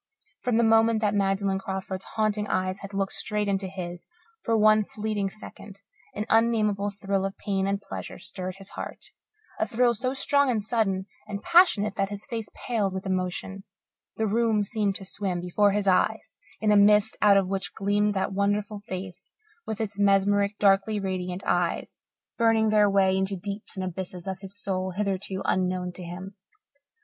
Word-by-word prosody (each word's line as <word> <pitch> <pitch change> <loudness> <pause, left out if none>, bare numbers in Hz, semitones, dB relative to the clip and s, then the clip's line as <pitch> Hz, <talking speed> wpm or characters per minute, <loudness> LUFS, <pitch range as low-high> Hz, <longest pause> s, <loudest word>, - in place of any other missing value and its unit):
From 245 -3 +1
the 235 - +4
moment 225 0 +4
that 210 -1 +2
Magdalen 195 -1 +1
Crawford's 190 0 -5
haunting 215 -1 0
eyes 185 0 -1
had 200 0 -8
looked 195 0 -1
straight 210 -1 -1
into 195 -1 0
his 175 -2 -7 0.3
for 225 -1 +1
one 215 0 +5
fleeting 210 -1 -2
second, 200 -1 -12 0.3
an 210 - -2
unnamable 215 -3 +2
thrill 195 -1 -2
of 195 0 -3
pain 195 -1 -1
and 200 0 0
pleasure 195 -1 -7
stirred 185 0 -6
his 195 0 -12
heart, - - -8 0.5
a - - +1
thrill 240 +1 +3
so 255 +4 -2
strong 280 0 +2
and 220 -4 0
sudden 200 -4 0 0.2
and 200 0 -5
passionate 335 - +4
that 195 -1 0
his 205 0 -6
face 230 -5 -5
paled 210 -6 -1
with 190 +1 -5
emotion; 190 +1 -3 0.5
the 220 - +1
room 220 0 +2
seemed 205 -2 -1
to 195 - -8
swim 190 -2 -3
before 180 +4 +2
his 200 0 0
eyes 185 -1 +1 0.2
in 215 -1 +2
a - - +5
mist 210 +1 +5
out 205 -1 +6
of 195 -2 +2
which 195 0 -3
gleamed 205 +1 +1
that 195 0 -1
wonderful 205 +1 0
face 185 -2 -8 0.3
with 220 -2 -3
its 210 -2 -4
mesmeric, 200 +1 +3
darkly 200 +1 +3
radiant 185 -1 -3
eyes, - - -1 0.4
burning 225 -1 +4
their 210 -1 +4
way 195 -1 +3
into 190 +1 0
deeps 200 +2 -7
and 190 - -2
abysses 180 -1 -5
of 190 -1 -4
his 195 +1 -6
soul 185 -2 -2
hitherto 195 -1 -2
unknown 180 -1 0
to 180 - -7
him. 180 +3 -8
200 Hz, 175 wpm, -26 LUFS, 190-215 Hz, 0.5 s, out